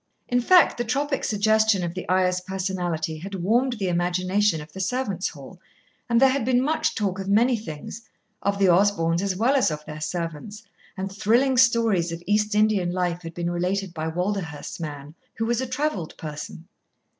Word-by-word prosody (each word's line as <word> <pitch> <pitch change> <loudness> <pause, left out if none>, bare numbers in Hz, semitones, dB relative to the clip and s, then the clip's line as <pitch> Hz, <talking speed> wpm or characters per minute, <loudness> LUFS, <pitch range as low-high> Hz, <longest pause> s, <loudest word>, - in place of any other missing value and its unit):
In 245 0 +1
fact 360 0 +5
the - - +1
tropic 275 +4 -1
suggestion 215 -2 +2
of 170 -1 -3
the 185 - -7
Ayah's 185 0 +2
personality 180 -4 -3
had 195 +4 -6
warmed 235 +8 +1
the 205 -5 -3
imagination 180 +2 +1
of 150 0 -11
the 190 - -8
servants' 200 -1 -1
hall, 160 +4 -12 0.5
and 235 -1 +4
there 265 +1 +6
had 270 -2 -1
been 245 +1 +2
much 310 +3 0
talk 195 -3 -1
of 195 0 -4
many 235 +5 +4
things, 205 0 -7 0.4
of 200 0 0
the 195 -1 +3
Osborns 175 -2 +3
as 195 -1 -1
well 235 +8 +2
as 265 - +3
of 150 -1 -6
their 155 0 -8
servants, 170 +5 -5 0.3
and 190 +1 -4
thrilling 230 +7 +2
stories 230 -8 +3
of 170 +1 -6
East 210 +1 +1
Indian 210 -4 +2
life 175 -1 -1
had 165 -1 -9
been 175 0 -2
related 180 +1 -2
by 160 -1 -3
Walderhurst's 180 -3 -3
man, 145 -2 -7 0.2
who 225 - -2
was 240 +1 0
a 260 - -3
travelled 255 - -3
person. 155 +2 -8
190 Hz, 185 wpm, -24 LUFS, 175-225 Hz, 0.5 s, there